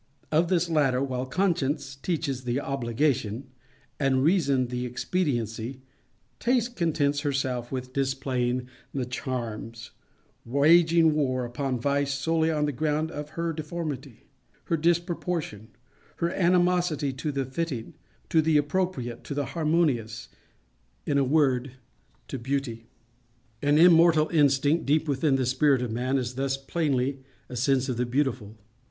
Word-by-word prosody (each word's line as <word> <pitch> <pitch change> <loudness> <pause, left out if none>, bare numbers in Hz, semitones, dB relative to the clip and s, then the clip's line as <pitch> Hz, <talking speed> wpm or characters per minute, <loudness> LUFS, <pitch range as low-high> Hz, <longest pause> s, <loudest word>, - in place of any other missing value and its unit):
Of 160 +3 +3
this 175 -1 +1
latter, 140 -5 +2
while 130 -1 -3
Conscience 145 -5 0
teaches 140 -3 -2
the 125 +2 -1
obligation, 130 -2 -1 0.5
and 135 -2 +2
Reason 140 -7 +2
the 125 0 -3
expediency, 125 - -2 0.6
Taste 245 0 +1
contents 145 -5 +1
herself 130 -4 -2
with 130 -1 -5
displaying 130 -2 -1 0.3
the 130 -2 -1
charms:—waging 130 +7 0
war 130 -4 0
upon 125 +1 -3
Vice 140 +2 0
solely 160 +3 +1
on 150 -2 +1
the 145 - 0
ground 155 +3 -1
of 150 -1 -6
her 170 0 -1
deformity—her 155 -2 -6
disproportion—her 165 - -3
animosity 175 -5 +2
to 140 +3 -3
the 135 -1 -2
fitting, 130 -3 -4 0.4
to 160 - +4
the 155 -1 +3
appropriate, 145 -6 -1
to 140 - -5
the 145 -1 -1
harmonious—in 120 - -3
a - - +3
word, 135 -2 +2 0.5
to 135 - -5
Beauty. 120 -3 -3 0.7
An 145 +1 +3
immortal 165 -2 +6
instinct 145 0 +2
deep 155 +2 +2
within 140 0 +2
the 130 -1 +1
spirit 130 +1 +2
of 120 - -3
man 125 +4 0
is 125 -1 -2
thus 135 +1 -1
plainly 135 -2 -1 0.3
a 125 - -7
sense 130 +1 +1
of 125 -3 -2
the 125 0 0
Beautiful. 120 -5 -1
140 Hz, 125 wpm, -27 LUFS, 125-160 Hz, 0.7 s, immortal